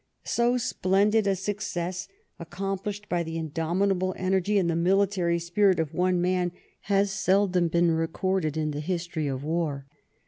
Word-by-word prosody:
So 240 +1 +2
splendid 210 -2 +2
a 195 - +2
success, 190 -2 -3 0.3
accom 190 +3 -4
plished 205 0 -5
by 175 -2 0
the 165 0 -4
indomitable 180 +4 0
energy 190 +2 +1
and 185 -3 +2
the 165 - 0
military 180 0 +2
spirit 180 +3 +2
of 160 -1 -2
one 180 +1 +1
man, 180 0 0 0.4
has 200 0 +3
seldom 185 -2 +2
been 170 +1 +2
recorded 165 0 -1
in 155 -1 -1
the 145 - -4
history 170 -1 -2
of 135 -1 -3
war. 155 -3 -2
180 Hz, 150 wpm, -27 LUFS, 165-195 Hz, 0.4 s, has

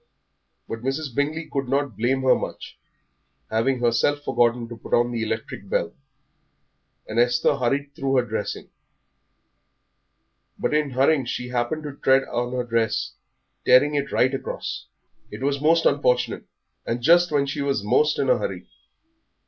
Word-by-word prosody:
But 115 - -5
Mrs. 135 +1 -3
Bingley 150 +5 -1
could 135 -3 -3
not 140 -3 0
blame 130 +5 0
her 130 - +6
much, - - -5 0.8
having 120 +3 +1
herself 120 +5 +2
forgotten 120 -2 +1
to 120 - -7
put 115 - -1
on 120 0 +2
the 115 -1 -2
electric 110 - -4
bell, - - -1 1.1
and 110 +2 -1
Esther 120 +3 +3
hurried 140 +3 -1
through 135 0 -1
her 125 -2 +3
dressing. 110 -2 -5 1.9
But - - -1
in 150 -1 +1
hurrying 135 +2 +2
she 125 +1 -4
happened 125 +5 -2
to 145 -2 -6
tread 135 -1 +3
on 120 -1 -3
her 125 -1 -1
dress, 115 -2 -1 0.5
tearing 135 +4 +5
it 140 -1 -1
right 130 +2 +2
across. 135 - -5 0.4
It - - -8
was 140 0 0
most 165 +2 +3
unfortunate, 125 -4 +1 0.4
and 120 +1 -3
just 175 +3 +5
when 145 -2 +2
she 140 +1 -3
was 140 -7 -1
most 145 +8 +2
in - - 0
a - - +3
hurry. - - -4
130 Hz, 155 wpm, -24 LUFS, 120-145 Hz, 1.9 s, her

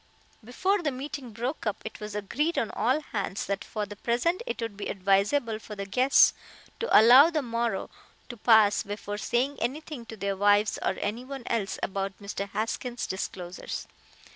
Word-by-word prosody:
Before 375 - 0
the 310 - 0
meeting 270 -1 -6
broke 240 +4 -4
up 210 - -1
it 220 - -7
was 210 0 -6
agreed 290 - -1
on 225 - 0
all 255 +8 +1
hands 200 -8 -3
that 195 0 -2
for 210 +1 -4
the 205 +1 -9
present 245 - 0
it - - -3
would 225 -3 -4
be 200 - -5
advisable 205 +5 +1
for 215 -1 -9
the 200 -1 -5
guests 255 +7 +5 0.5
to 465 - +5
allow 250 +8 +8
the 310 -4 -1
morrow 235 -1 -1 0.4
to 240 - -6
pass 220 -2 +5
before 205 0 -5
saying 260 +6 0
anything 270 0 -4
to 225 - -8
their 200 0 -1
wives 205 +2 +3
or - - 0
anyone 250 +5 -4
else 220 -3 -1
about 195 0 -2
Mr. 200 -1 -5
Haskins' 235 +3 -3
disclosures. 185 -1 -5
225 Hz, 170 wpm, -28 LUFS, 205-255 Hz, 0.5 s, allow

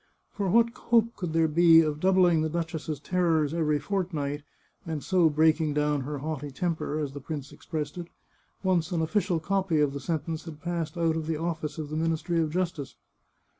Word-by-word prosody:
For 200 -2 -1
what 230 +4 +4
hope 230 -1 +1
could 175 -4 -4
there 165 0 +3
be 165 +1 +6
of 150 -2 -1
doubling 180 -2 +4
the 155 - 0
duchess's 160 -2 -3
terrors 165 -5 +1
every 155 -3 +1
fortnight, 155 -6 -2 0.4
and 160 -3 -4
so 180 -4 +3
breaking 155 0 +2
down 150 -1 +1
her 145 +3 -4
haughty 145 0 -4
temper, 155 +1 -2
as 145 -3 -3
the 145 - -7
prince 145 -1 -6
expressed 155 +1 -5
it, 170 - -6 0.6
once 180 -4 +1
an 165 -2 0
official 175 0 0
copy 190 -1 0
of 145 -2 +2
the 140 - -4
sentence 160 +2 -3
had 155 -3 -9
passed 170 -2 -3
out 165 -1 +1
of 160 -1 -3
the 160 -1 -1
office 160 -2 -3
of 155 -2 -5
the - - -3
Ministry 165 +1 0
of 155 - 0
Justice? 170 -4 -3
160 Hz, 190 wpm, -27 LUFS, 150-175 Hz, 0.6 s, be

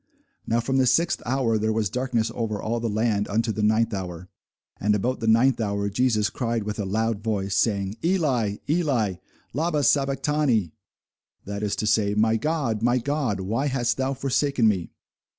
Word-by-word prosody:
Now 115 - +2
from 135 +3 -1
the 130 -1 +3
sixth 170 +7 +2
hour 120 -4 +1
there 110 +1 0
was 110 -3 -1
darkness 125 -3 -1
over 110 -3 -2
all 115 +2 -2
the 115 0 -2
land 105 -1 0
unto 110 +2 0
the 110 0 -3
ninth 110 +2 +2
hour. 90 -2 -5 0.5
And 105 +1 +2
about 125 +6 -1
the 115 - -3
ninth 115 +3 +4
hour 100 -1 -1
Jesus 110 -1 +1
cried 115 -3 -2
with 105 +1 -4
a 105 - -1
loud 110 +2 -1
voice, 100 -3 -1
saying, 100 0 0
Eli, 140 - +1
Eli, 135 - +1 0.4
lama 155 +1 0
sabachthani? 135 - +1 0.7
that 100 +1 -5
is 105 -1 -1
to 105 - -2
say, 105 -1 +2
My 110 +1 +3
God, 135 -4 -1
my 120 +2 +3
God, 130 -6 -1
why 115 +9 -1
hast 120 -4 0
thou 135 +1 -1
forsaken 135 -2 +1
me? 95 -6 0
115 Hz, 175 wpm, -24 LUFS, 105-130 Hz, 0.7 s, ninth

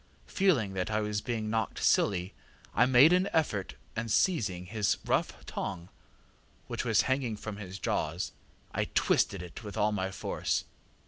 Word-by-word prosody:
Feeling 125 - +2
that 95 +1 -2
I 110 0 +1
was 105 0 -1
being 110 -3 -2
knocked 110 -1 -1
silly, 95 -1 +2 0.4
I 125 - +4
made 130 +6 +7
an 185 +2 +3
effort 105 -12 0 0.2
and 115 +1 -3
seizing 105 - +1
his 105 +1 0
rough - - 0
tongue, 90 -2 -5 0.8
which - - -3
was - - +3
hanging 130 -4 0
from 105 -1 -6
his 95 -2 -7
jaws, 80 -2 -1 0.4
I - - 0
twisted 95 -2 +1
it 90 +6 -9
with 105 -2 -7
all 105 +1 +3
my 95 -2 -1
force. 95 - -2
105 Hz, 155 wpm, -30 LUFS, 95-120 Hz, 0.8 s, made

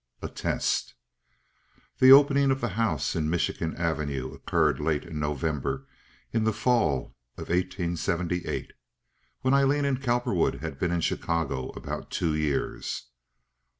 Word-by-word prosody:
A - - -3
Test - - -1 1.0
The 130 0 +8
opening 140 0 +7
of 135 0 +1
the 120 - -1
house 110 +1 0
in 80 -2 0
Michigan 80 -1 -1
Avenue 75 -6 -2
occurred - - +1
late 75 -2 0
in 85 -3 -6
November 75 -2 -2 0.5
in 115 -1 +2
the 110 - +3
fall 110 - +1 0.2
of - - -6
eighteen 85 -1 0
seventy 85 +1 -1
eight. - - -4 0.7
When 130 +1 +2
Aileen 140 +1 +3
and 135 -2 0
Cowperwood 120 -8 +1
had 70 - -6
been 90 - +1
in 85 -1 0
Chicago 80 -6 -1
about - - -6
two 80 -3 0
years. 75 -5 -2
85 Hz, 140 wpm, -27 LUFS, 75-120 Hz, 1.0 s, The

